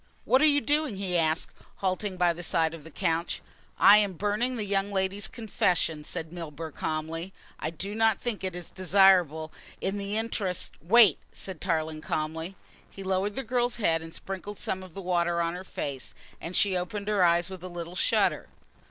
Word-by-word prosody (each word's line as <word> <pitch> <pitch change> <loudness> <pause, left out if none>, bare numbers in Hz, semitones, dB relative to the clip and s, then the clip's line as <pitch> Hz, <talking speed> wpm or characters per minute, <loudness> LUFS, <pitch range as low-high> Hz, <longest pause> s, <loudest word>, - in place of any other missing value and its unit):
"What 260 - +4
are - - +6
you 290 -1 +4
doing?" 295 -5 0
he 190 -2 -2
asked, 160 0 +1 0.2
halting 190 0 -2
by 175 -1 +3
the 170 - -8
side 160 -1 +1
of 165 -3 -9
the 160 - -11
couch. 165 0 -1 0.4
"I 210 +1 +8
am 205 -2 +1
burning 210 +7 0
the 215 -3 -2
young 200 0 0
lady's 190 +1 -1
confession," 180 -8 0
said 160 +2 -5
Milburgh 160 -2 -7
calmly. 165 +4 -3 0.3
"I 155 - -2
do 190 +6 -5
not 220 -1 +3
think 235 -5 -3
it 185 -2 -2
is 180 -2 -7
desirable 180 -5 +4 0.3
in 195 +1 -2
the 200 +1 -1
interests 210 -5 -1
" - - -33
"Wait," 205 -1 +6
said 190 -4 -5
Tarling 160 -3 -1
calmly. 160 +4 -3 0.3
He 195 - -9
lowered 190 +2 0
the 270 - -3
girl's 245 0 0
head 165 -8 +1
and 165 0 -9
sprinkled 195 +3 -6
some 190 - -1
of 185 -3 -12
the 195 - -6
water 175 -1 +1
on 170 0 0
her 180 +1 -6
face, 140 -7 -5 0.3
and 175 +2 -5
she 195 -2 +4
opened 200 +3 -3
her 205 -3 +3
eyes 170 +1 +3
with 185 -2 -8
a 185 - -6
little 175 0 -7
shudder. - - +2
185 Hz, 195 wpm, -28 LUFS, 165-205 Hz, 0.4 s, I